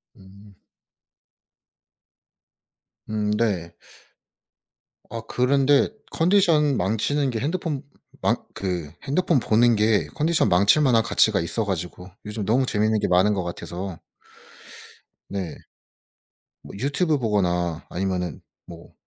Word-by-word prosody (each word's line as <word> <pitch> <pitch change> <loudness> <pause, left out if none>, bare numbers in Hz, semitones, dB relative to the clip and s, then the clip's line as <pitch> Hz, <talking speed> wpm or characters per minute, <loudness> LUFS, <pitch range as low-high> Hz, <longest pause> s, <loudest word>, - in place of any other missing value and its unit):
음. 100 +1 -17 2.5
음 105 -1 -1
네. 95 -7 -1 1.3
아 115 +1 -5
그런데 135 +3 +3 0.2
컨디션 165 -6 +3
망치는 115 +9 0
게 115 -3 -2
핸드폰 155 0 -2 0.4
망 - - +2 0.2
그 90 -5 -3
핸드폰 165 0 +1
보는 115 +1 +3
게 105 0 +2
컨디션 160 -6 +2
망칠 100 +11 +4
만한 120 -5 +4
가치가 - - +3
있어 105 +7 -1
가지고 90 -1 -4 0.2
요즘 105 -1 -4
너무 125 +6 +2
재밌는 110 -2 +1
게 - - 0
많은 95 +4 +3
거 95 -2 -2
같아서 85 +1 -6 1.3
네. 95 -6 -4 1.1
뭐 - - -12
유튜브 145 - +1
보거나 90 -7 0
아니면은 90 -5 -3 0.2
뭐 85 -1 -13
105 Hz, 210 characters per minute, -24 LUFS, 95-135 Hz, 2.5 s, 망칠